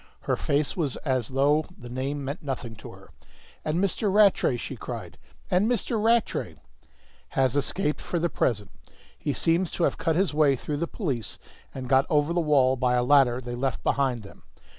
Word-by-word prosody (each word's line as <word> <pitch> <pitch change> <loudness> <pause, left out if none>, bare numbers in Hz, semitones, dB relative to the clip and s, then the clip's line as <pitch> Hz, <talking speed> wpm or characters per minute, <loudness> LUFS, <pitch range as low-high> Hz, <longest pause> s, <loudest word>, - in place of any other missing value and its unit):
Her - - 0
face 145 +1 0
was 150 -8 -1
as 130 -5 0
though 145 +4 +2
the 120 - -10
name 135 +3 -3
meant 140 +5 -4
nothing 125 -5 -5
to - - -10
her. - - -16 0.5
"And 155 +1 -1
Mr. 200 +2 0
Rattray?" 200 -10 +4
she - - -6
cried. - - -7 0.3
"And 190 +5 +3
Mr. 230 -2 0
Rattray 230 0 +1 0.4
" 60 0 -32
"Has 130 -1 +3
escaped 150 +2 0
for 175 - -3
the 170 +1 +1
present. 105 -10 -1 0.4
He 145 - -3
seems 165 +4 +1
to 175 - -1
have - - +1
cut 160 - +1
his 190 -1 +1
way 145 -2 +4
through 145 +3 -4
the 170 +3 -1
police 135 - -3 0.3
and 130 -1 -6
got 135 +1 +3
over 150 +2 +2
the 175 - +1
wall 135 -4 +3
by 125 0 +2
a 125 - +2
ladder 125 -2 +4
they 120 -1 -6
left 130 0 -2
behind 130 -5 0
them. 100 - -14
140 Hz, 190 wpm, -26 LUFS, 130-170 Hz, 0.5 s, Rattray